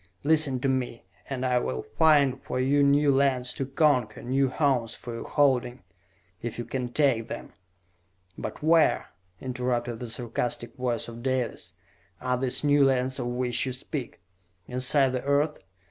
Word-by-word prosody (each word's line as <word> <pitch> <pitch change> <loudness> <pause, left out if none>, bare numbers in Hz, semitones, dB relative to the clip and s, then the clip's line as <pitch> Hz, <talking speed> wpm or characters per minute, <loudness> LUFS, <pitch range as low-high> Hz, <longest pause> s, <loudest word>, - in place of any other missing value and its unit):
Listen 150 -3 +3
to 135 - +1
me, 130 -3 -2 0.3
and 130 -2 -3
I 125 -1 +2
will 65 - -3
find 145 -5 +4
for - - -4
you 140 +3 +3
new 140 +1 +4
lands 130 -2 +1
to 135 - -4
conquer, 135 -6 +1
new 135 +2 +1
homes 130 -5 0
for 120 - -8
your 115 - -7
holding, 130 -5 +1 0.6
if 120 -2 -5
ye 120 - -4
can 125 +1 -4
take 125 -6 +2
them!" - - -7 0.8
"But - - -7
where," 160 0 +3 0.3
interrupted 125 -2 -2
the 120 - -6
sarcastic 120 +1 -3
voice 125 -3 -2
of 115 0 -9
Dalis, 130 -2 -2 0.4
"are 125 0 0
these 125 +2 0
new 145 -1 +4
lands 130 -1 +1
of - - -2
which 125 +1 -1
you 130 - -2
speak? 130 +1 -6 0.5
Inside 130 +2 +2
the 125 -1 -3
Earth? 145 +2 +1
130 Hz, 160 wpm, -27 LUFS, 120-140 Hz, 0.8 s, find